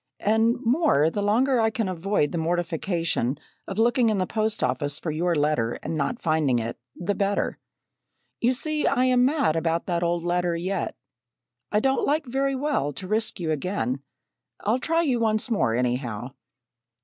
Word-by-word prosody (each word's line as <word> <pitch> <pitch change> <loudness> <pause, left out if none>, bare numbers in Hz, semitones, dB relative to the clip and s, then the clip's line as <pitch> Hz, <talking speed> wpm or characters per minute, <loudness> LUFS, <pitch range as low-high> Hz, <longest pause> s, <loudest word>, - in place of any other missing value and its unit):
And 220 +3 +3
more, 230 - +3
the 205 - -2
longer 240 +6 +2
I 225 0 +3
can 220 -2 -2
avoid 185 -3 0
the 170 - -2
mortification 165 -4 -1 0.3
of 195 - -5
looking 235 +1 +3
in 215 - +1
the 185 - +1
post 215 +2 -1
office 145 -1 -1
for 160 - -3
your 170 +3 0
letter, 145 -6 +1
and 165 - -3
not 155 - -1
finding 155 -6 +2
it, 115 0 -4 0.2
the 185 +3 -1
better. 200 0 -1 0.8
You 240 - +3
see 305 +4 0
I 255 - +3
am 250 -1 +4
mad 275 - +2
about 165 0 0
that 170 -2 -1
old 170 0 0
letter 175 0 0
yet. 185 +3 -2 0.8
I 210 - +2
don't 265 +2 +1
like 300 +1 +1
very 270 +2 0
well 265 - 0
to 185 +8 -8
risk 220 0 -1
you 165 -3 -1
again. 150 -4 -2 0.6
I'll 220 +5 +1
try 330 +5 +1
you 260 -7 +1
once 220 +1 +1
more, 115 - +2
anyhow." 125 -2 -1
190 Hz, 175 wpm, -25 LUFS, 160-235 Hz, 0.8 s, am